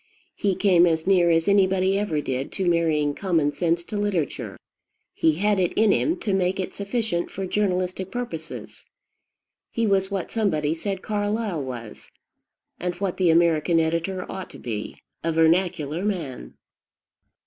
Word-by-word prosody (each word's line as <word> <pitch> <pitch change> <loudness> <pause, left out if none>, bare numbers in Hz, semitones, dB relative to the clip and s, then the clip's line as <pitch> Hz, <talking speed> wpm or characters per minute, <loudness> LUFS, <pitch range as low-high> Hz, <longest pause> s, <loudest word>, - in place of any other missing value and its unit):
He 200 -2 0
came 180 -2 +5
as 160 -1 0
near 185 -3 +4
as 165 -1 +2
anybody 190 -1 +3
ever 165 -8 -1
did 135 -1 -3
to 190 -2 -1
marrying 160 -4 +2
common 165 -5 +1
sense 170 +3 0
to 210 - -5
literature: 200 -8 -2 0.6
he 160 - +2
had 200 +4 +1
it 180 -2 +1
in 220 -1 +4
him 325 - +1
to 205 - -1
make 190 0 +1
it 185 - -3
sufficient 200 -4 -2
for 195 - -5
journalistic 185 -1 -1
purposes. 190 -9 -6 0.9
He 230 - -1
was 195 -2 +2
what 195 -3 -3
somebody 155 -9 +1
said 190 +3 -4
Carlyle 205 -4 -1
was, 120 -4 -8 0.7
and 180 0 -2
what 190 0 -3
the 185 -2 +3
American 165 0 +3
editor 170 +3 -1
ought 190 -1 -6
to - - -11
be, 110 -3 -5 0.3
a 165 - +1
vernacular 165 -1 +2
man. 170 -11 -4
180 Hz, 150 wpm, -24 LUFS, 160-195 Hz, 0.9 s, came